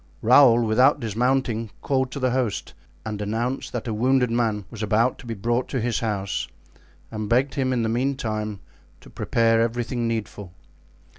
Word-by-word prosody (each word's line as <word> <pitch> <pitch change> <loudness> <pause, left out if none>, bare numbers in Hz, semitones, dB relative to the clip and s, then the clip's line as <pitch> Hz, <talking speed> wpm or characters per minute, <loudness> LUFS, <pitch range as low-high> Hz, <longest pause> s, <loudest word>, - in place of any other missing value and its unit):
Raoul, 120 0 +6
without 125 +7 +4
dismounting, 115 0 0
called 130 -2 0
to 140 - -6
the 130 -1 +1
host 125 -5 -2 0.3
and 105 -1 -4
announced 115 +5 -2
that 120 -1 -4
a 115 - -1
wounded 125 +2 +2
man 110 -4 0
was 115 - -8
about 110 +4 +1
to 120 - -12
be 115 - -4
brought 120 +5 -1
to 130 - -2
his 115 -1 -1
house 100 -4 -2 0.6
and 110 -2 -4
begged 130 +4 +2
him 130 -2 0
in 120 -2 0
the - - 0
meantime 110 -5 -2 0.4
to - - -15
prepare 115 -1 +2
everything 120 +1 -1
needful. 105 -5 -4
115 Hz, 165 wpm, -24 LUFS, 110-125 Hz, 0.6 s, Raoul